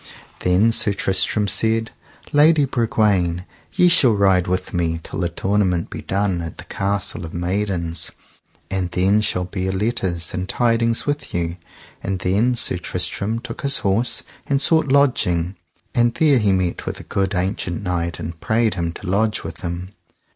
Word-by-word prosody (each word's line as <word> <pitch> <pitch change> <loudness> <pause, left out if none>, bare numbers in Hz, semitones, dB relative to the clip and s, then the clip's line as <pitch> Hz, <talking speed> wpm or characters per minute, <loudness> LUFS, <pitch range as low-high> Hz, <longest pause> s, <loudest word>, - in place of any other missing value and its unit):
Then 95 +6 +3
Sir 110 -2 +3
Tristram 100 +2 +1
said: 110 +2 +1 0.4
Lady 150 0 +5
Bragwaine, 100 -8 +1 0.3
ye 180 - +5
shall 155 -9 +5
ride 95 -3 +3
with 90 +1 -2
me 85 -2 0
till - - -6
that 85 -2 -2
tournament 95 -3 +1
be - - -6
done 95 -3 0
at 80 -2 -7
the - - -8
Castle 100 -2 -2
of 80 - -8
Maidens, 90 -2 -1 0.6
and 95 -2 -1
then 95 +4 +2
shall 90 -4 -1
bear 95 +1 -2
letters 95 -5 -1
and 90 +1 -3
tidings 115 -1 +2
with 145 -8 -3
you. 85 0 -1 0.4
And 95 0 -2
then 100 +7 +1
Sir - - 0
Tristram 110 +3 -2
took 120 -2 -7
his 140 0 0
horse 105 +6 +1 0.2
and 140 -1 +2
sought 160 +2 +2
lodging, 100 -11 +2 0.4
and 120 0 +2
there 145 -5 +4
he 105 -3 +2
met 95 -2 -1
with - - -3
a - - -9
good 95 0 -1
ancient 90 0 -2
knight 85 -2 -2
and 80 0 -6
prayed 110 +2 +1
him 85 -2 -2
to - - -9
lodge 105 +4 +1
with - - -6
him. 90 +1 -5
95 Hz, 165 wpm, -21 LUFS, 90-115 Hz, 0.6 s, Lady